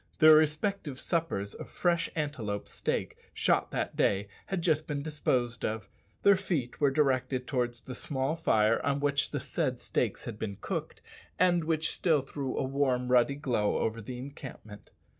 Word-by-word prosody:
Their 155 Hz, -1 st, +9 dB
respective 155 Hz, -1 st, +1 dB
suppers 160 Hz, -, -1 dB
of -, -, -9 dB
fresh 170 Hz, -1 st, +1 dB
antelope 125 Hz, -, -3 dB
steak, -, -, -2 dB, 0.2 s
shot -, -, +2 dB
that -, -, -2 dB
day, 100 Hz, 0 st, +1 dB, 0.2 s
had 190 Hz, -3 st, -2 dB
just 155 Hz, -2 st, +2 dB
been 145 Hz, -1 st, -2 dB
disposed 125 Hz, -6 st, -1 dB
of. 110 Hz, 0 st, -2 dB, 0.4 s
Their 200 Hz, 0 st, +7 dB
feet 165 Hz, -10 st, -2 dB
were 145 Hz, -, +5 dB
directed 130 Hz, -3 st, +1 dB
towards 120 Hz, -3 st, -1 dB
the 130 Hz, -, -8 dB
small 135 Hz, +4 st, -2 dB
fire 110 Hz, -9 st, +2 dB
on 140 Hz, 0 st, +1 dB
which 145 Hz, 0 st, +1 dB
the -, -, -2 dB
said -, -, -2 dB
steaks -, -, -1 dB
had 110 Hz, -2 st, -6 dB
been 100 Hz, -3 st, -4 dB
cooked, -, -, -4 dB, 0.4 s
and 175 Hz, -2 st, +3 dB
which 160 Hz, 0 st, 0 dB
still 155 Hz, -6 st, +2 dB
threw 135 Hz, -1 st, -4 dB
a -, -, +1 dB
warm, 130 Hz, -2 st, 0 dB
ruddy 125 Hz, +2 st, +4 dB
glow 125 Hz, -8 st, 0 dB
over 115 Hz, +1 st, -1 dB
the 125 Hz, +3 st, -6 dB
encampment. 125 Hz, -5 st, -9 dB
140 Hz, 165 wpm, -30 LUFS, 120-155 Hz, 0.4 s, Their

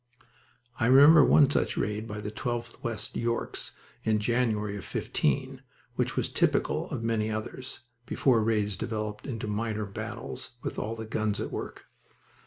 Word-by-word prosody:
I 115 Hz, -, +3 dB
remember 145 Hz, +4 st, +9 dB
one 140 Hz, +1 st, +6 dB
such -, -, +1 dB
raid 105 Hz, +2 st, -1 dB
by 105 Hz, -1 st, -5 dB
the 105 Hz, 0 st, -4 dB
12th 120 Hz, +1 st, -4 dB
West 115 Hz, -2 st, -4 dB
Yorks 115 Hz, 0 st, -2 dB, 0.3 s
in 110 Hz, -1 st, +2 dB
January 105 Hz, -2 st, 0 dB
of 100 Hz, -, -6 dB
'15, 70 Hz, -, -1 dB, 0.3 s
which -, -, -1 dB
was -, -, +1 dB
typical -, -, +1 dB
of 115 Hz, -, -4 dB
many 110 Hz, -1 st, 0 dB
others, 110 Hz, +5 st, -5 dB, 0.3 s
before 120 Hz, -5 st, +3 dB
raids 105 Hz, -2 st, +1 dB
developed 105 Hz, 0 st, -4 dB
into 115 Hz, -5 st, -4 dB
minor 110 Hz, 0 st, -2 dB
battles, 110 Hz, +5 st, -6 dB
with -, -, -3 dB
all 110 Hz, +2 st, -3 dB
the 110 Hz, 0 st, -6 dB
guns 110 Hz, -1 st, -1 dB
at -, -, -3 dB
work. -, -, -6 dB
110 Hz, 155 wpm, -29 LUFS, 105-120 Hz, 0.3 s, remember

